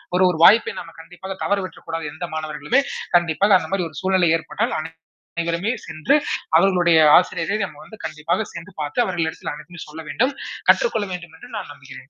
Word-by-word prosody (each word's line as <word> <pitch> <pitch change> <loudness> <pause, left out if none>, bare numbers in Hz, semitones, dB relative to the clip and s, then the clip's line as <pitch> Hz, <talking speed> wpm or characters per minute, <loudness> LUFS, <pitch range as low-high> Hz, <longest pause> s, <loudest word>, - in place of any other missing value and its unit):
ஒரு 185 - +4
ஒரு 165 - -1
வாய்ப்பை 220 +5 +7
நம்ம 165 -1 -10
கண்டிப்பாக 180 +3 -8
தவற 200 - +1
விட்டுறகூடாது, 165 -3 -6
எந்த 175 +2 -5
மாணவர்களுமே! 155 - 0 0.4
கண்டிப்பாக 175 +4 +4
அந்த - - -6
மாரி 190 -3 0
ஒரு 155 - -17
சூழ்நிலை 185 -3 +3
ஏற்பட்டால் 230 +8 -2
அனை 160 - -6 0.5
அனைவருமே 170 +6 -1
சென்று, 160 - +1 0.4
அவர்களுடைய 175 -3 +4 0.2
ஆசிரியரை 195 +3 0
நம்ம 155 -5 -12
வந்து 220 - -13
கண்டிப்பாக 160 +6 -2
சென்று 170 +4 -9
பாத்து 145 +10 -3
அவர்கள் 175 -3 -1
இடத்தில் 160 - -5
அனைத்தையும் 165 +2 -10
சொல்ல 160 +1 -9
வேண்டும். 260 +4 +1 0.4
கற்றுக்கொள்ள 220 - +3
வேண்டும் 175 -2 -8
என்று - - -11
நான் - - -6
நம்புகிறேன். 135 -1 -13
170 Hz, 175 wpm, -21 LUFS, 160-190 Hz, 0.5 s, வாய்ப்பை